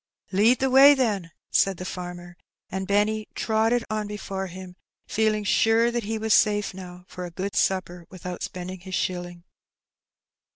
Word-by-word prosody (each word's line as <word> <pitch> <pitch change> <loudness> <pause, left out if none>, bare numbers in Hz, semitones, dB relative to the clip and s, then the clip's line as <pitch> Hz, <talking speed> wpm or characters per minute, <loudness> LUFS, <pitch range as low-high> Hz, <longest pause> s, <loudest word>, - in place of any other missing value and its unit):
"Lead 215 +6 +4
the 265 +1 0
way, 275 +2 +8
then," 210 -10 0 0.2
said 195 -2 +2
the 185 - -6
farmer; 175 -1 -7 0.4
and 190 0 -3
Benny 210 +1 +1
trotted 225 +2 +1
on 215 -1 -2
before 195 -2 -5
him, 185 0 -10 0.3
feeling 215 -1 0
sure 225 +3 +3
that 235 -2 -2
he 220 +1 -2
was 220 -1 +1
safe 210 -2 +3
now 180 -1 -10
for 180 - -8
a 175 - -5
good 190 +3 -5
supper 180 -2 -1
without 180 -1 -7
spending 185 +1 -6
his 185 +1 -6
shilling. 175 -1 -3
195 Hz, 160 wpm, -25 LUFS, 180-220 Hz, 0.4 s, way